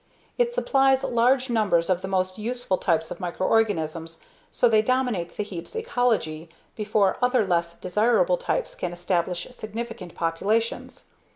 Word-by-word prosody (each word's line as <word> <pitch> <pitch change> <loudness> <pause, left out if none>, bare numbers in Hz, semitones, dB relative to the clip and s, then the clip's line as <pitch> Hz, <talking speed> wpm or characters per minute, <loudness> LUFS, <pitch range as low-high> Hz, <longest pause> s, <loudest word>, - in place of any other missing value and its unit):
It 480 -1 +3
supplies 270 - +2
large 250 +2 +2
numbers 210 -8 +2
of 185 -1 +1
the 190 - -4
most 185 0 -1
useful 240 -3 -2
types 160 -3 0
of - - -6
microorganisms 170 -4 0 0.3
so 245 - +3
they 220 -2 +4
dominate 245 -7 -1
the - - 0
heap's 180 - -8
ecology 225 - 0 0.3
before 210 -2 +1
other 250 -3 +3
less 170 -2 0
desirable 235 - +2
types - - -2
can 175 -1 -4
establish 175 0 -1
significant 220 -5 -7
populations. 200 +8 -1
210 Hz, 135 wpm, -25 LUFS, 175-245 Hz, 0.3 s, they